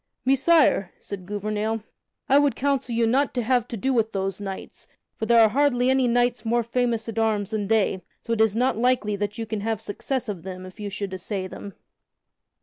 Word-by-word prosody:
"Messire," 270 - +3
said 185 -3 -8
Gouvernail, 210 +2 -2 0.4
"I 275 +2 +6
would 290 -1 +2
counsel 270 -3 -1
you 230 0 +3
not 265 +4 +1
to 245 - 0
have 245 0 +1
to 235 - -5
do 265 +6 0
with 225 -2 +1
those 195 0 -2
knights, 195 -1 -7 0.3
for 220 - -4
there 235 -1 +6
are 220 -1 +7
hardly 260 0 +2
any 265 -1 +3
knights 240 -1 +1
more 235 +1 +1
famous 235 -1 -1
at 225 0 -3
arms 215 -2 0
than 210 -2 -2
they, 210 -3 +1 0.2
so 230 - -2
it 225 - +1
is 220 -2 +3
not 245 -1 +1
likely 240 -4 +1
that 205 +2 -3
you 225 - -3
can 220 -1 -3
have 220 0 -2
success 260 +5 -3
of 200 -5 -4
them 185 +1 -7
if 185 +3 -13
you 205 -1 -4
should 200 -1 -4
assay 185 +1 -4
them." 195 0 -9
225 Hz, 210 wpm, -24 LUFS, 205-245 Hz, 0.4 s, are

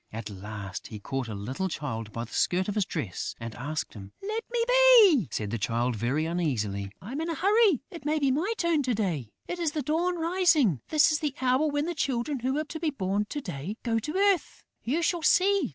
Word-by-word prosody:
At 110 -1 -6
last, 100 -1 -7
he 110 - -8
caught 135 +3 -3
a 110 - -5
little 130 - -3
Child 115 -10 -4
by 115 - -4
the 115 - -11
skirt 185 +1 +1
of 205 - -1
his 210 -2 +1
dress 115 - -4
and 115 -1 -6
asked 150 +7 -4
him. 100 -3 -11
"Let 435 +3 -2
me 475 -1 +1
be," 485 - +7
said 105 -2 -3
the 115 - -2
Child, 120 +4 0
very 125 +8 0
uneasily. 110 - -2
"I'm 260 +10 -4
in 330 - -2
a 330 - -1
hurry: 400 - +3
it 335 -5 -9
may 300 +2 +1
be 280 -3 +2
my 325 +11 0
turn 340 -3 +2
to 255 -4 0
day.... 170 - -2 0.2
It 355 - -4
is 325 -3 0
the 300 - -2
Dawn 345 +5 0
rising. 330 - +3
This 310 0 +5
is 305 - +1
the 295 -3 -2
hour 260 +4 +2
when 290 0 0
the 345 - -2
Children 270 -2 -1
who 260 +4 -1
are 305 - 0
to 320 +1 -7
be 320 -1 0
born 205 -6 -1
to 290 +7 -5
day 180 - -5
go 235 - -2
down 225 - +3
to 300 +9 -5
earth.... 395 -2 +1 0.2
You 300 +9 0
shall 345 0 +1
see.... 385 0 +3
245 Hz, 230 wpm, -28 LUFS, -, 0.2 s, be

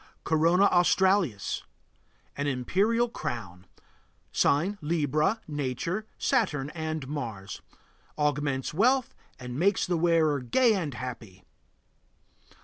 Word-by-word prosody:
CORONA 165 +4 +3
AUSTRALIS. 175 - +2 0.7
An 140 0 -2
imperial 195 - +1
crown. 95 - -6 0.6
Sign: 185 +8 +1
Libra. 155 - 0
Nature: 150 - -3
Saturn 150 - 0
and 160 -4 -4
Mars. 110 -9 -6 0.6
Augments 145 -3 -1
wealth 250 - +2 0.2
and 125 +1 -6
makes 195 +3 +2
the 175 -2 0
wearer 160 -3 +3
gay 225 - +3
and 160 -10 -2
happy. 115 -7 -8
155 Hz, 95 wpm, -28 LUFS, 130-185 Hz, 0.7 s, CORONA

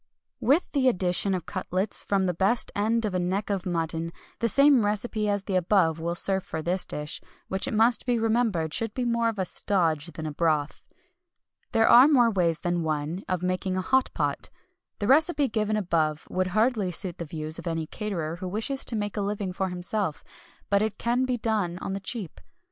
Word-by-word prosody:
With 290 +7 +2
the 270 -3 +2
addition 185 -2 +1
of 180 - -5
cutlets 185 +1 -3
from 195 -1 +1
the 180 - 0
best 195 +7 +1
end 220 +2 +1
of 205 - -2
a 185 - 0
neck 190 +4 -1
of 190 -2 -2
mutton, 165 -1 -2 0.3
the 230 - +1
same 275 -1 +5
recipe 210 +1 -1
as 205 -1 0
the 195 - -3
above 175 -3 +2
will 170 +1 -2
serve 190 +1 +1
for 160 - -5
this 180 +3 0
dish, 150 +1 -5 0.3
which 190 0 -1
it 270 - -3
must 230 +2 +3
be 245 -1 +2
remembered 220 -8 +1
should 225 -2 -1
be 250 - -1
more 235 -1 +1
of 225 - -5
a 190 - 0
"stodge" 170 -5 0
than 160 - -6
a 155 - -3
broth. 155 -1 0 0.9
There 225 0 +3
are 250 +4 +8
more 245 -6 +4
ways 170 -4 +1
than 175 -1 0
one 155 +2 -2
of 185 -1 -1
making 185 +1 -1
a - - 0
"hot 260 +6 +2
pot." - - -1 0.5
The 205 - -3
recipe 290 +3 +4
given 215 -2 0
above 160 -6 0
would 185 0 0
hardly 215 0 +1
suit 180 0 -4
the 170 - -4
views 155 +1 -4
of 170 - -7
any 165 -1 -2
caterer 170 -3 -4
who 185 +1 -5
wishes 225 +8 -1
to 235 - -3
make 205 -1 -3
a - - 0
living 200 -2 -2
for 190 0 -2
himself; 180 -1 -3 0.5
but 200 0 +4
it 215 -1 -1
can 245 +2 +1
be 255 -1 -1
done 210 -7 -1
on 190 - -4
the 195 - -3
cheap. 200 -3 -6
195 Hz, 205 wpm, -26 LUFS, 175-225 Hz, 0.9 s, are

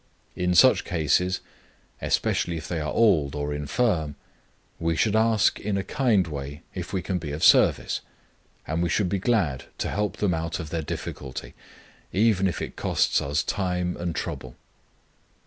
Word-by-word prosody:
In 90 0 0
such 130 +9 +6
cases, 90 +2 +1 0.6
especially 85 -1 0
if 80 - -7
they 85 - -2
are 75 - -2
old 80 -12 +3
or 75 0 -2
infirm, 75 - 0 0.6
we 85 0 0
should 105 +5 +2
ask 110 -1 +3
in 100 -1 -1
a 95 - -1
kind 110 -8 +2
way 70 0 -6
if 90 -2 -6
we 95 -3 -2
can 90 -2 -1
be 80 -3 -5
of 75 +4 -4
service; - - +4 0.6
and 80 +2 -1
we 85 - +1
should 90 +1 +1
be 100 - 0
glad 90 - +1
to - - -2
help 105 0 -1
them 100 -4 +1
out 80 0 -2
of 80 -3 -6
their 85 - -1
difficulty, 65 -3 -6 0.6
even 100 -2 +3
if 85 - -2
it - - -6
costs - - +1
us 70 +1 0
time 90 -2 -1
and 85 -1 -3
trouble. 65 -1 -5
85 Hz, 165 wpm, -25 LUFS, 75-100 Hz, 0.6 s, such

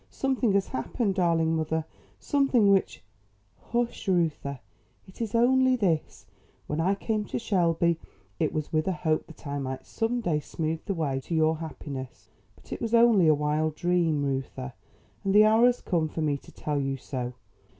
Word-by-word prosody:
Something 260 -5 0
has 195 -1 +1
happened, 195 - -1
darling 165 -3 +2
mother; 160 0 -1 0.3
something 270 -8 +3
which 195 - +1 0.3
" 100 +1 -39
"Hush, 240 -2 -1
Reuther; 160 -7 0 0.5
it 190 - -12
is 225 -1 -2
only 260 +2 +4
this: 170 - -1 0.4
When 150 - -3
I 190 +4 +2
came 215 +1 -1
to - - -4
Shelby 170 -6 +1 0.4
it - - +1
was 155 0 -4
with 155 +2 +1
a 190 - +1
hope 160 -3 -1
that 160 - -15
I 140 0 -3
might 130 -1 -5
some 230 +2 -1
day 170 -10 0
smooth 160 +1 -3
the 195 - -2
way 140 -5 -1
to 165 +5 -4
your 160 0 +3
happiness. 140 -5 -8 0.3
But - - -10
it - - -6
was 230 0 +1
only 230 -7 +6
a 155 - +6
wild 150 +1 0
dream, 170 -4 +1
Reuther; 135 -1 -3 0.5
and 195 0 +1
the 210 +1 +8
hour 220 +3 +5
has 245 0 +1
come 165 -4 0
for 160 - -4
me 150 -2 +1
to 140 - -11
tell 145 -2 -2
you 135 0 -2
so. 125 -1 -5
165 Hz, 180 wpm, -27 LUFS, 150-210 Hz, 0.5 s, the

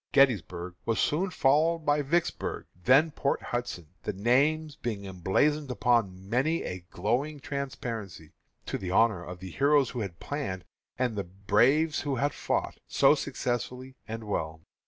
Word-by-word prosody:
Gettysburg 90 - +2
was 115 -1 0
soon 180 +6 +1
followed 160 +1 +2
by 145 0 +3
Vicksburg, 170 +5 -1
then 135 - +4
Port 140 -1 0
Hudson, 120 -10 -4
the - - -2
names 145 +9 +2
being 105 -7 -4
emblazoned 115 - +1
upon 115 -7 +1
many 135 +9 +1
a 90 - -4
glowing 140 +7 -1
transparency, 115 - -5 0.3
to - - -3
the 95 - -4
honor 100 -2 +3
of 90 0 -7
the 95 0 -8
heroes 140 - +3
who 125 - -4
had 95 -6 -5
planned, 95 - -4 0.3
and 125 -3 0
the 100 - -1
braves 115 - +2
who 140 -2 -1
had 145 +3 0
fought, - - -2
so - - +5
successfully 125 +2 -3
and 115 0 -5
well. 80 -6 -3
120 Hz, 150 wpm, -29 LUFS, 95-145 Hz, 0.3 s, so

